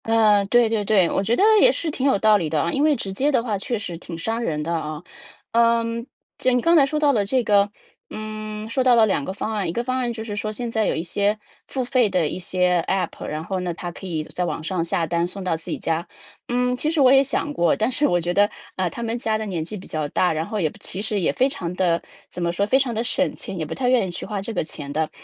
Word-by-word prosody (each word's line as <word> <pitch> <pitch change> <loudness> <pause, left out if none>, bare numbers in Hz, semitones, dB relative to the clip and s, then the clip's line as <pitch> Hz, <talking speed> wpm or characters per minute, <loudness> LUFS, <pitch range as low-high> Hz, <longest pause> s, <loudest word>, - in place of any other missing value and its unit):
呃， 215 -3 +4
对 240 +2 +4
对 220 -1 0
对， 195 -4 +4
我 - - +1
觉 225 +4 +1
得 385 - +2 0.2
也 - - +7
是 325 - -3
挺 275 -1 -1
有 265 - +4
道 215 +1 +5
理 165 -6 -2
的 155 0 0
啊。 170 - 0
因 275 - 0
为 305 -1 +4
直 195 -7 -5
接 275 +9 +1
的 250 -4 +2
话 220 -4 -1
确 235 +4 -2
实 205 -5 -5
挺 170 -1 -8
伤 225 +7 -2
人 150 -9 -1
的 170 +2 -2
啊。 155 -1 -4 0.5
嗯， 230 0 +2 0.3
既 - - +2
然 250 - +3
你 - - +1
刚 335 +5 +4
才 300 - +7
说 300 +2 -1
到 295 -2 +4
了 210 -5 +2
这 250 +5 +1
个 205 -1 +3 0.4
嗯， 215 0 -6
说 260 +3 0
到 250 -1 +5
了 225 -1 +6
2 190 -8 0
个 190 - -4
方 210 +3 -4
案， 200 -5 -1
一 - - -1
个 235 +7 -2
方 255 +1 -1
案 245 -2 -1
就 220 -1 -5
是 210 -2 -5
说 215 0 -3
现 235 +2 -4
在 220 -1 +1
有 - - 0
一 160 - -2
些 200 +4 0 0.3
付 260 -2 -2
费 250 -3 +2
的 180 -5 +1
一 180 - -4
些 180 0 +1
App， 190 -1 -2
然 155 +1 -4
后 190 0 -2
呢， 180 -1 -2
它 175 +1 -5
可 185 - -10
以 160 -3 -2
在 180 - -4
网 170 -2 -3
上 175 0 -1
下 165 0 0
单 170 +1 0
送 195 +2 -7
到 180 -3 0
自 160 - -9
己 - - -2
家。 165 +1 -2 0.4
嗯， 250 +1 +1
其 305 +5 -1
实 325 - -1
我 265 -1 +6
也 270 0 +6
想 290 +2 -2
过， 175 - +2
但 220 +2 +1
是 275 +3 0
我 175 - +2
觉 175 +1 -1
得， 205 +2 +4 0.3
啊， 185 -2 0
他 235 - -8
们 230 0 -2
家 220 -2 0
的 220 - -4
年 180 -6 -3
纪 210 +6 -7
比 185 - -11
较 155 -1 -2
大， 180 +2 +2
然 160 +1 -2
后 215 +4 -3
也 160 -5 +1
其 190 - -5
实 210 0 -2
也 - - +2
非 260 - +2
常 185 - -4
地 175 -2 +1 0.3
怎 175 - -5
么 170 - +1
说， 200 +4 0
非 260 - +4
常 265 -3 0
地 220 - -1
省 275 +3 0
钱， 190 - -7
也 160 - -2
不 155 - -5
太 255 - -1
愿 250 -5 +3
意 185 - -5
去 - - -6
花 205 -2 -3
这 225 +4 -5
个 - - 0
钱 145 -2 -8
的。 155 +1 -1
210 Hz, 315 characters per minute, -23 LUFS, 175-240 Hz, 0.5 s, 也